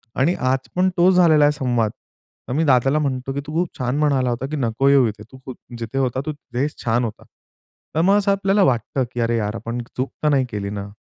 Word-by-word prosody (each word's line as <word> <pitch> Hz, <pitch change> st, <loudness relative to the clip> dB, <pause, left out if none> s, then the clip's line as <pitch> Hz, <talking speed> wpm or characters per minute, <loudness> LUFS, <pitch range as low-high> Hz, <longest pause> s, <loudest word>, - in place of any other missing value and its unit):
आणि 165 Hz, +7 st, +2 dB, 0.2 s
आज 130 Hz, 0 st, -2 dB
पण 185 Hz, +1 st, +3 dB
तोच 180 Hz, +2 st, +5 dB
झालेला 160 Hz, -5 st, +5 dB
आहे 145 Hz, -, +4 dB
संवाद, 120 Hz, -4 st, 0 dB, 0.6 s
तर -, -, -2 dB
मी 155 Hz, +4 st, +1 dB
दादाला 135 Hz, +2 st, +3 dB
म्हणतो, 135 Hz, -2 st, -2 dB
की 140 Hz, -, -3 dB
तू 150 Hz, -, -6 dB
खूप 170 Hz, +2 st, -2 dB
छान 125 Hz, +2 st, -1 dB
म्हणाला 135 Hz, -4 st, +2 dB
होता, 120 Hz, +2 st, -2 dB
की -, -, -2 dB
"नको 125 Hz, +2 st, +1 dB
येऊ 135 Hz, -4 st, +5 dB
इथे. 105 Hz, 0 st, -9 dB
तू 130 Hz, 0 st, -9 dB, 0.3 s
जिथे 115 Hz, +3 st, -5 dB
होता 130 Hz, 0 st, 0 dB
तू 155 Hz, -, -2 dB
तिथेच 140 Hz, +1 st, -4 dB
छान 120 Hz, +2 st, +2 dB
होता." 110 Hz, -, -7 dB, 0.7 s
तर 160 Hz, -, +3 dB
मग 195 Hz, +4 st, +4 dB
असं 200 Hz, -1 st, +2 dB
आपल्याला 195 Hz, +1 st, +2 dB
वाटतं, 130 Hz, -, +1 dB
की 120 Hz, -, -4 dB
"अरे 115 Hz, 0 st, +1 dB
यार, 105 Hz, 0 st, -2 dB
आपण 115 Hz, +1 st, -5 dB
चूक 130 Hz, +2 st, -2 dB
तर 150 Hz, -, +3 dB
नाही 135 Hz, -3 st, +2 dB
केली 100 Hz, -1 st, -3 dB
ना?" 100 Hz, 0 st, -6 dB
130 Hz, 225 wpm, -21 LUFS, 120-150 Hz, 0.7 s, तोच